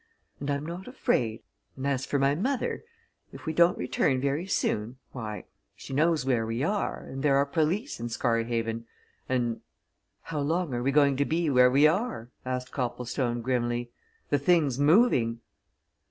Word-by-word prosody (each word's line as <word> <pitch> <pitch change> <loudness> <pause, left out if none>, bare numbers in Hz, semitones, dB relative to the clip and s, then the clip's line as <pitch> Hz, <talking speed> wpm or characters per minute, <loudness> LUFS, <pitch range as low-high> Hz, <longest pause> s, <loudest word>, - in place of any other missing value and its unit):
And 145 - -4
I'm 140 +1 -1
not 175 +5 -6
afraid 115 - -1 0.3
and 130 - -4
as 135 -2 0
for 145 - 0
my 140 0 +3
mother, 245 - -1 0.5
if - - -11
we 160 - -2
don't 170 +2 +4
return 130 -2 +1
very 140 +7 -1
soon, 115 - -1
why, 110 -4 -6 0.3
she - - -9
knows 155 -1 +2
where 125 -4 +2
we 115 +3 -2
are 205 +5 -1
and 135 0 -7
there 140 -1 +3
are 140 +1 +4
police 165 - -1
in 120 - -4
Scarhaven, 115 -1 -1 0.4
and 120 -3 0 0.3
" - - -50
"How 155 - -1
long 160 +1 0
are 120 - -1
we 135 +3 +1
going 140 -2 +4
to 140 - +2
be 160 0 0
where 125 -1 +6
we 140 +4 +5
are?" 155 - 0 0.2
asked 125 0 -3
Copplestone, 120 -1 -2
grimly. 120 -1 -1 0.4
"The 145 - +3
thing's 145 -4 +2
moving!" 145 - +4
135 Hz, 170 wpm, -28 LUFS, 120-155 Hz, 0.5 s, where